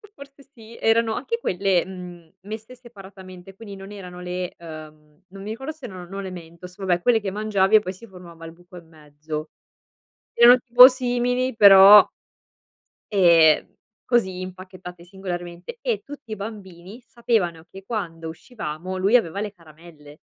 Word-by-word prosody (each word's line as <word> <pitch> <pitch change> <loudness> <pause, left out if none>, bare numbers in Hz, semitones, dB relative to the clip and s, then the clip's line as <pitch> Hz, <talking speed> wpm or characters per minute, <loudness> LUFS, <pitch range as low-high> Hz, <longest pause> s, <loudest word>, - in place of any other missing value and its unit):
Forse 280 0 -15
sì, 225 -1 -15
erano 225 0 +1
anche 465 - -3
quelle, 185 - 0
mhmm, 180 -3 -11
messe 220 +4 -9
separatamente, 195 -5 -14
quindi 205 -1 -11
non 195 +1 -11
erano 180 -3 -10
le, 180 0 -5
uhm, 155 -1 -13
non 195 +1 -12
mi 210 - -7
ricordo 265 +7 -6
se 305 -5 -13
erano, 185 -5 -9
no, 195 +2 -8
le 190 -1 -7
mentos, 175 +1 -12
vabbè 185 -3 -1
quelle 235 +3 +3
che 200 -3 -5
mangiavi 210 -1 +1
e - - +8
poi 185 -3 -6
si 190 +5 -14
formava 175 -4 -14
al 165 - -10
buco 175 +1 -16
in 170 -2 -14
mezzo. 155 0 -9 0.8
Erano 240 +1 +7
tipo 245 +1 +8
simili 250 -1 -1
però 200 0 +9 1.1
ehm, 170 -6 +4 0.4
così 190 -7 0
impacchettate 185 -1 -10
singolarmente 175 - -8
e 475 -4 -2
tutti 280 -5 -12
i - - -3
bambini 200 -1 -10
sapevano 215 -9 -2
che 195 +1 -14
quando 165 -7 -5
uscivamo 175 -1 -7
lui 195 +5 +2
aveva 200 -4 +1
le 210 - -4
caramelle. 155 -4 -17
190 Hz, 155 wpm, -22 LUFS, 175-220 Hz, 1.1 s, però